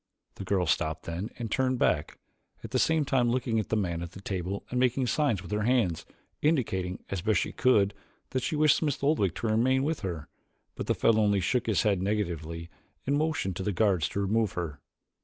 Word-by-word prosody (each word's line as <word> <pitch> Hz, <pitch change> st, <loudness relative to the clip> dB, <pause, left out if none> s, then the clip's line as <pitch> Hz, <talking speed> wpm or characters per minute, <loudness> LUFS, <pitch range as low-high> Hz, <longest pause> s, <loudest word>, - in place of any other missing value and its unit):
The -, -, -8 dB
girl 95 Hz, -1 st, +1 dB
stopped 80 Hz, -1 st, 0 dB
then 85 Hz, +6 st, -4 dB
and 115 Hz, -3 st, -5 dB
turned 130 Hz, -1 st, +1 dB
back, -, -, +1 dB, 0.5 s
at -, -, -8 dB
the -, -, +1 dB
same 160 Hz, -2 st, +2 dB
time 125 Hz, -3 st, +2 dB
looking 120 Hz, -2 st, 0 dB
at 110 Hz, -, -3 dB
the -, -, +1 dB
man 85 Hz, -5 st, -1 dB
at 85 Hz, 0 st, -7 dB
the -, -, -9 dB
table 95 Hz, 0 st, -4 dB
and 125 Hz, -, 0 dB
making 130 Hz, +1 st, +2 dB
signs 120 Hz, -6 st, +1 dB
with 95 Hz, -, -10 dB
her 105 Hz, 0 st, 0 dB
hands, 110 Hz, -8 st, +1 dB, 0.3 s
indicating, 95 Hz, -, 0 dB
as 95 Hz, -3 st, -2 dB
best 105 Hz, 0 st, +2 dB
she -, -, -3 dB
could, 105 Hz, -6 st, +3 dB, 0.4 s
that 130 Hz, -, 0 dB
she 155 Hz, -, -1 dB
wished 150 Hz, 0 st, +5 dB
Smith 145 Hz, -4 st, -1 dB
Oldwick 140 Hz, -, +2 dB
to 115 Hz, -, -2 dB
remain 125 Hz, +5 st, +2 dB
with 155 Hz, +2 st, -1 dB
her, 85 Hz, -7 st, -5 dB, 0.5 s
but -, -, -6 dB
the -, -, +2 dB
fellow 110 Hz, -1 st, +3 dB
only 100 Hz, -1 st, +3 dB
shook 120 Hz, +6 st, 0 dB
his 110 Hz, -4 st, +2 dB
head 100 Hz, -4 st, +2 dB
negatively 85 Hz, -5 st, -2 dB, 0.4 s
and 140 Hz, -, +1 dB
motioned 155 Hz, -, 0 dB
to -, -, -3 dB
the 105 Hz, -, 0 dB
guards 95 Hz, -5 st, +2 dB
to -, -, -3 dB
remove 105 Hz, +1 st, +1 dB
her. 80 Hz, -5 st, -4 dB
105 Hz, 215 wpm, -28 LUFS, 90-130 Hz, 0.5 s, wished